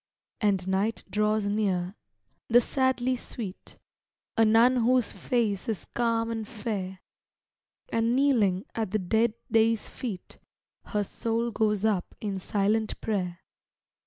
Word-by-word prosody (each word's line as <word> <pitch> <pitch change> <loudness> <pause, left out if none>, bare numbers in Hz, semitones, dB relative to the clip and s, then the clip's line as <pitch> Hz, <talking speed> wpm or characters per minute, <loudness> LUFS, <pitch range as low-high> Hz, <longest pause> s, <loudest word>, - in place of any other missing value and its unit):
And 195 -3 +1
night 195 +4 0
draws 210 0 +1
near, 195 -3 0 0.5
the 240 +1 +6
sadly 260 0 +1
sweet 220 -5 -8 0.6
A 225 - +5
nun 230 +4 +5
whose 245 0 +2
face 225 -5 -1
is 210 -7 -3
calm 230 -1 +1
and 225 -2 -4
fair 205 -5 -4 0.9
And 230 +1 +2
kneeling 225 -9 +3
at 220 -4 -2
the 215 - +1
dead 220 +4 +1 0.2
day's 225 -1 +3
feet 215 -8 -7 0.5
Her 210 -1 -1
soul 230 +3 -2
goes 210 -1 +1
up 200 -5 0
in 200 -3 -3
silent 210 +3 0
prayer. 180 -5 -2
220 Hz, 125 wpm, -28 LUFS, 200-230 Hz, 0.9 s, the